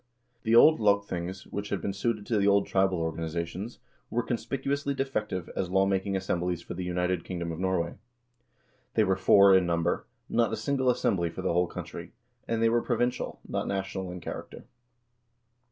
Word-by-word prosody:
The 115 -1 +2
old 155 +6 +7
lagthings, 95 -3 0
which 100 0 -4
had - - -1
been - - -3
well - - -2
suited 105 +1 -1
to 110 -2 +1
the 100 - +2
old 100 0 +4
tribal 95 -1 +2
organization, 85 +4 -3 0.4
were 120 +1 0
conspicuously 135 +5 -2
defective 105 -10 -2
as 95 - -1
lawmaking 95 +1 +1
assemblies 90 -2 -1
for - - -7
the 90 +1 -4
united 90 -1 -1
kingdom 85 -2 -4
of 80 - -6
Norway. 90 -3 0 1.0
They 110 - +5
were 95 -2 +2
four 100 +1 +6
in 95 -2 +3
number, 85 0 0 0.2
not 115 -2 +2
a 110 - -2
single 130 +3 +1
assembly 95 -8 +1
for 90 +3 -7
the 95 - +1
whole 90 +1 +2
country, - - -8 0.3
and 115 0 0
they - - +5
were 120 +1 +2
provincial, 120 0 -1
not - - -2
national 95 -1 -3
in 90 0 -7
character. - - -7
95 Hz, 175 wpm, -28 LUFS, 90-110 Hz, 1.0 s, old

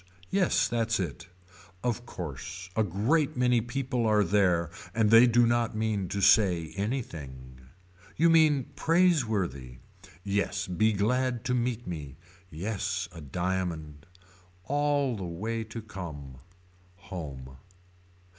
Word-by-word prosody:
Yes 190 -2 +2
that's 115 -2 0
it. 85 -1 -4 0.6
Of 120 0 -2
course 90 - -7
a 110 - +3
great 120 - +1
many 125 -1 +3
people 125 0 -2
are 105 -1 +4
there 90 -4 +2 0.2
and 110 -2 +3
they 115 +2 +8
do 120 0 +4
not 120 -1 +1
mean 110 -3 -1
to 100 - -2
say 90 -7 +4
anything. 75 - -5 0.6
You 165 +1 +5
mean 155 -5 +4
praiseworthy. 110 - +1 0.5
Yes 100 +1 -1
be 110 +5 +2
glad 125 +4 0
to 125 - 0
meet 120 -1 -1
me. 75 -6 -6 0.3
Yes 95 +1 -3
a 85 -2 -10
diamond. 80 -1 -3 0.6
All 145 +1 +1
the 100 - -6
way 110 +7 -3
to 115 0 -8
come. 75 -11 -8 0.6
Home. 70 -8 -8
105 Hz, 120 wpm, -28 LUFS, 85-120 Hz, 0.6 s, they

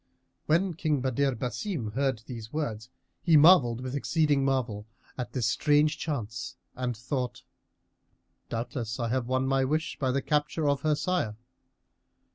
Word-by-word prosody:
When 175 +4 +2
King 155 -3 0
Badr 135 +1 +1
Basim 125 - -3
heard 130 -3 0
these 115 -2 -8
words 120 -7 -3 0.3
he 165 -3 +5
marvelled 145 -7 +6
with 130 0 -5
exceeding 145 0 +2
marvel 120 -6 -1 0.3
at 125 - -5
this 125 -4 0
strange 150 +6 +3
chance, 125 -7 -4 0.2
and 125 -2 -2
thought: 125 0 -3 1.1
"Doubtless 115 0 -4
I 115 -1 -1
have 125 0 -1
won 130 +1 +1
my 135 0 +2
wish 155 +6 -1
by 130 - +1
the 135 +1 0
capture 150 +1 0
of 140 -1 +1
her 155 -1 +2
sire." 160 -10 -1
135 Hz, 145 wpm, -28 LUFS, 120-150 Hz, 1.1 s, marvelled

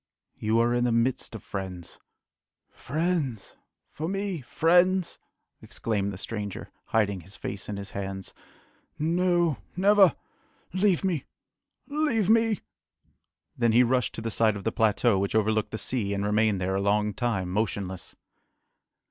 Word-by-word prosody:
"You 110 +1 +2
are 120 +1 +2
in 120 0 +2
the 120 - +2
midst 115 0 0
of 110 - -8
friends." 95 -3 -6 0.7
"Friends! 155 - -2 0.4
for 155 - -4
me! 195 -4 -2
friends!" 175 +6 +2 0.4
exclaimed 100 -3 -2
the 95 - -7
stranger, 105 0 -5
hiding 100 -4 +1
his 95 +5 -11
face 100 +1 -5
in 105 - -3
his 100 0 -6
hands. 95 -1 -5 0.6
"No 175 -1 +1 0.2
never 195 0 +5 0.6
leave 190 -1 +2
me! 175 -8 -1 0.6
leave 285 - +1
me!" 225 -2 +3 0.9
Then 120 -2 +2
he 120 +2 +6
rushed 125 -1 +1
to - - -5
the 115 0 -3
side 110 0 +2
of 100 - -6
the 115 - 0
plateau 110 -1 +2
which 100 +2 -1
overlooked 110 0 +2
the 110 - -4
sea, 105 -5 -1
and 100 +1 -1
remained 105 -1 +2
there 95 +1 -1
a 95 - 0
long 105 +1 +1
time 100 -6 -1
motionless. 95 -3 -3
115 Hz, 145 wpm, -27 LUFS, 100-170 Hz, 0.9 s, he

